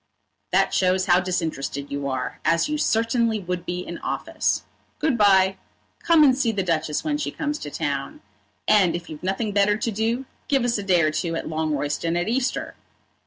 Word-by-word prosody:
"That - - +2
shows 185 0 +2
how 180 -2 +5
disinterested 160 -6 -3
you 140 0 -3
are, 130 -2 -3
as 165 - +2
you 300 0 -2
certainly 230 -2 +1
would 180 -2 -4
be 180 0 -2
in - - -7
office. - - -1 0.3
Good 300 -4 +1
bye. 195 -3 +4 0.4
Come 330 -2 +5
and 265 -3 +6
see 250 -3 +1
the 200 -3 -1
Duchess 160 -3 -1
when 295 -1 -1
she - - -2
comes 300 -1 -3
to 145 - -6
town. 140 -2 -3 0.5
And 190 -5 +4
if 175 -1 -7
you've 150 - -8
nothing 195 +4 -1
better 205 +1 +3
to 230 - -2
do, 225 +5 -1 0.2
give 275 -4 +2
us 240 -3 +1
a - - -4
day 180 -4 +3
or 155 - +2
two 165 +2 -2
at - - -3
Longroyston 155 +1 -1
at 175 - -2
Easter." 250 +3 -1
190 Hz, 190 wpm, -24 LUFS, 165-230 Hz, 0.5 s, and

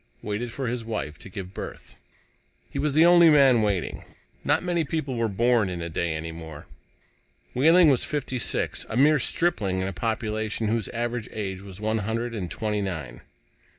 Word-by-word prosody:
waited 110 +3 -3
for 135 +2 -4
his 120 0 -2
wife 80 -10 -4
to - - -11
give 95 0 -7
birth. - - -8 0.8
He - - -4
was 150 -1 0
the 160 +3 +6
only 175 -1 +7
man 135 -6 +6
waiting. 100 -5 -1 0.4
Not - - +2
many 175 -2 +1
people 145 -4 -3
were 115 -1 +1
born 115 0 +2
a 85 -2 -4
day 80 0 -1
any 80 +1 -5
more. 80 -2 -9 0.9
Wehling 165 +6 +6
was 135 -4 +4
fifty 135 -4 -3
six, - - -1
a 110 - -2
mere 150 +3 +5
stripling 115 - 0
in 95 - -1
a 95 - -4
population 110 +1 -2
whose 115 -1 0
average 120 -1 -3
age 95 -3 -4
was 95 -1 -10
one 110 +1 0
hundred 115 +3 -2
and 95 -6 -4
twenty 105 +1 -2
nine. 80 -10 -5
110 Hz, 180 wpm, -25 LUFS, 95-130 Hz, 0.9 s, only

